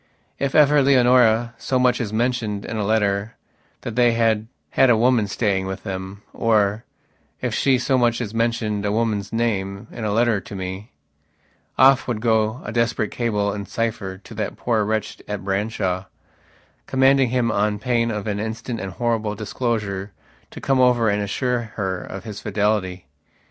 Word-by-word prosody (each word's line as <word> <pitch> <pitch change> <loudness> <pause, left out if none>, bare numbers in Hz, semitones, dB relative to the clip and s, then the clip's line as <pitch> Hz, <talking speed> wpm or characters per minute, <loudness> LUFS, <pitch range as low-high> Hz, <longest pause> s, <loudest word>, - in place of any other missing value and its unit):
If 140 -1 -1
ever 150 -1 +6
Leonora 125 -3 +4
so 130 - 0
much 125 -1 +2
as 110 -3 -3
mentioned 110 -3 -1
in - - -5
a 105 - -1
letter 100 0 0 0.5
that 115 - -6
they 120 -1 +4
had 110 -2 +1 0.2
had 135 - +4
a 115 - +5
woman 120 -2 +3
staying 100 -2 0
with 95 +1 -5
themor, 100 +2 -1 0.6
if - - -2
she 135 -2 +3
so 130 +1 +1
much 120 -1 +2
as 110 -3 -4
mentioned 115 -3 -1
a 100 - 0
woman's 105 -2 -1
name 100 -3 -1
in 115 - -7
a 105 - -1
letter 115 -1 +2
to 100 - -10
meoff 95 - -1
would 120 -4 -2
go 110 0 +1
a - - -5
desperate 115 -2 0
cable 105 -4 -1
in 100 -1 -6
cipher 110 -5 -3
to 105 - -13
that 110 0 -4
poor 115 -3 +1
wretch 110 +1 -2
at 105 -2 -5
Branshaw, 95 -2 -1 0.8
commanding 135 -1 +4
him 120 -1 +1
on 105 0 +1
pain 115 +2 0
of 105 -3 -3
an 105 -2 -2
instant 115 +2 -4
and 95 -3 -5
horrible 110 -1 -1
disclosure 105 -3 -3 0.4
to - - -10
come 135 -1 +1
over 125 -3 +4
and 105 0 0
assure 120 +2 -2
her 95 -3 -2
of 95 - -8
his 105 -3 -7
fidelity. 100 -4 -1
110 Hz, 165 wpm, -22 LUFS, 100-120 Hz, 0.8 s, ever